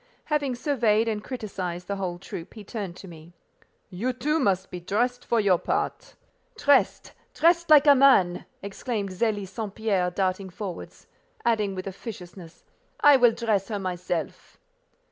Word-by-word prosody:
Having 290 Hz, -4 st, 0 dB
surveyed 235 Hz, -5 st, +1 dB
and 215 Hz, -2 st, -2 dB
criticized 185 Hz, -8 st, -5 dB
the 200 Hz, -, -3 dB
whole 180 Hz, -3 st, -3 dB
troop, 175 Hz, 0 st, -9 dB
he 215 Hz, -, -9 dB
turned 200 Hz, -4 st, -6 dB
to 190 Hz, -, -11 dB
me. 165 Hz, 0 st, -13 dB, 0.6 s
"You, 230 Hz, +8 st, -2 dB
too, 300 Hz, +6 st, 0 dB
must 190 Hz, -, 0 dB
be 180 Hz, -, -5 dB
dressed 240 Hz, +8 st, -1 dB
for 235 Hz, -, +1 dB
your 195 Hz, -5 st, +3 dB
part." 415 Hz, +5 st, -3 dB, 0.4 s
"Dressed—dressed 335 Hz, +4 st, +2 dB
like 300 Hz, -1 st, +8 dB
a 290 Hz, -, +8 dB
man!" 255 Hz, -11 st, +4 dB, 0.2 s
exclaimed 200 Hz, +1 st, -4 dB
Zélie 205 Hz, +1 st, -1 dB
St. 205 Hz, +1 st, -6 dB
Pierre, 200 Hz, -5 st, 0 dB
darting 185 Hz, +1 st, -2 dB
forwards; 185 Hz, -1 st, -8 dB, 0.4 s
adding 210 Hz, -4 st, +1 dB
with 185 Hz, -, -5 dB
officiousness, 185 Hz, -4 st, -9 dB, 0.4 s
"I 290 Hz, -1 st, +8 dB
will 240 Hz, -2 st, +5 dB
dress 215 Hz, -5 st, 0 dB
her 215 Hz, -, -3 dB
myself." 180 Hz, -3 st, -4 dB
205 Hz, 145 wpm, -26 LUFS, 185-245 Hz, 0.6 s, like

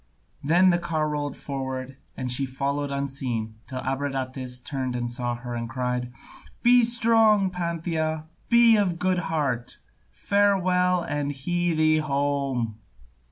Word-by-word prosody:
Then 175 Hz, +6 st, +5 dB
the 175 Hz, -, +2 dB
car 160 Hz, -3 st, -1 dB
rolled 145 Hz, -2 st, -3 dB
forward 130 Hz, -1 st, -5 dB, 0.2 s
and 130 Hz, -1 st, -3 dB
she 135 Hz, +2 st, 0 dB
followed 140 Hz, +2 st, -2 dB
unseen 130 Hz, -6 st, -3 dB
till 130 Hz, -1 st, -5 dB
Abradatas 130 Hz, -1 st, -3 dB
turned 130 Hz, -1 st, -4 dB
and 120 Hz, -1 st, -2 dB
saw 120 Hz, -1 st, -2 dB
her 120 Hz, 0 st, -7 dB
and 115 Hz, -1 st, -4 dB
cried, 125 Hz, -1 st, -2 dB, 0.5 s
"Be 245 Hz, 0 st, +6 dB
strong, 225 Hz, -4 st, +4 dB
Pantheia, 165 Hz, -3 st, -2 dB, 0.2 s
be 235 Hz, -1 st, +6 dB
of 200 Hz, -4 st, +2 dB
a -, -, -10 dB
good 180 Hz, +1 st, +1 dB
heart! 145 Hz, -8 st, -2 dB, 0.3 s
Farewell, 185 Hz, -3 st, +2 dB
and 145 Hz, -1 st, -2 dB
hie 175 Hz, +5 st, -1 dB
thee 155 Hz, 0 st, +4 dB
home!" 140 Hz, -6 st, -1 dB
145 Hz, 135 wpm, -25 LUFS, 130-175 Hz, 0.5 s, Be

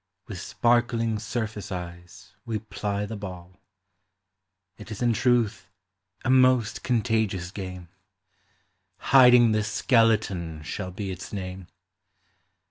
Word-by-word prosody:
With 95 Hz, -4 st, -7 dB
sparkling 115 Hz, -1 st, +1 dB
surface 110 Hz, -2 st, -4 dB
eyes 85 Hz, -1 st, -8 dB
Ave 115 Hz, -2 st, -1 dB
ply 100 Hz, 0 st, -2 dB
the 110 Hz, -, -6 dB
ball 90 Hz, -3 st, -8 dB
r 90 Hz, -, -32 dB, 1.2 s
It 105 Hz, -, -11 dB
is 110 Hz, +2 st, -5 dB
in 120 Hz, -1 st, +3 dB
truth 110 Hz, -5 st, +1 dB, 0.6 s
a -, -, 0 dB
most 130 Hz, -4 st, +3 dB
contagious 110 Hz, -7 st, 0 dB
game; 90 Hz, -3 st, -7 dB, 1.1 s
Hiding 125 Hz, -3 st, +6 dB
the 110 Hz, 0 st, +1 dB
Skeleton 105 Hz, -, +1 dB
shall 90 Hz, +5 st, -5 dB
be 95 Hz, +1 st, -5 dB
its 90 Hz, -, -8 dB
name. 95 Hz, -2 st, -6 dB
105 Hz, 115 wpm, -26 LUFS, 95-115 Hz, 1.2 s, Hiding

